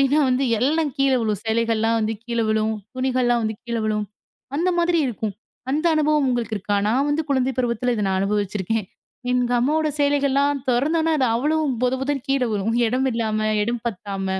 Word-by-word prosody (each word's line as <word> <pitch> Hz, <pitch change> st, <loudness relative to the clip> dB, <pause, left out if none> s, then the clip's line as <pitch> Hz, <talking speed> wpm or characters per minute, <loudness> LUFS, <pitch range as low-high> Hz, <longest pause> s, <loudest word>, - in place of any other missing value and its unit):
அப்டின்னா 275 Hz, +3 st, +3 dB
வந்து 255 Hz, +2 st, +1 dB, 0.2 s
எல்லாம் 300 Hz, +3 st, +1 dB
கீழே 270 Hz, -1 st, +3 dB
விழும். 215 Hz, -3 st, -1 dB
சேலைகள்லாம் 225 Hz, 0 st, +1 dB
வந்து 220 Hz, +1 st, 0 dB
கீழ 235 Hz, -1 st, -3 dB
விழும். 220 Hz, 0 st, +1 dB, 0.2 s
துணிகள்லாம் 255 Hz, -2 st, +1 dB
வந்து 220 Hz, 0 st, -1 dB
கீழ 235 Hz, -1 st, -3 dB
விழும். 210 Hz, -1 st, 0 dB, 0.5 s
அந்த 350 Hz, +4 st, +1 dB
மாதிரி 345 Hz, 0 st, +2 dB
இருக்கும். 220 Hz, -3 st, -3 dB, 0.4 s
அந்த 310 Hz, +5 st, 0 dB
அனுபவம் 300 Hz, -2 st, +2 dB
உங்களுக்கு 230 Hz, -3 st, -1 dB
இருக்கா? 205 Hz, +1 st, -1 dB
நான் 265 Hz, +6 st, +2 dB
வந்து 295 Hz, +2 st, +1 dB
குழந்தை 265 Hz, -1 st, +1 dB
பருவத்துல 245 Hz, 0 st, 0 dB
இத 210 Hz, -3 st, -1 dB
நான் 190 Hz, 0 st, +1 dB
அனுபவிச்சிருக்கேன். 205 Hz, +1 st, -1 dB, 0.5 s
எங்க 250 Hz, -1 st, +1 dB
அம்மாவோட 310 Hz, +4 st, +1 dB
சேலைகள்லாம் 285 Hz, 0 st, +2 dB
தொறந்தோம்னா 315 Hz, +6 st, +1 dB
அது 260 Hz, -, +3 dB
அவ்வளவும் 295 Hz, +2 st, +1 dB
பொத 250 Hz, 0 st, +2 dB
பொதன் 275 Hz, -1 st, -2 dB
கீழே 270 Hz, -2 st, +2 dB
விழும். 210 Hz, +2 st, -1 dB
இடம் 255 Hz, +3 st, +1 dB
இல்லாம, 220 Hz, -2 st, -1 dB, 0.2 s
இடம் 235 Hz, +1 st, -2 dB
பத்தாம. 195 Hz, -2 st, -4 dB
245 Hz, 170 wpm, -22 LUFS, 220-280 Hz, 0.5 s, அப்டின்னா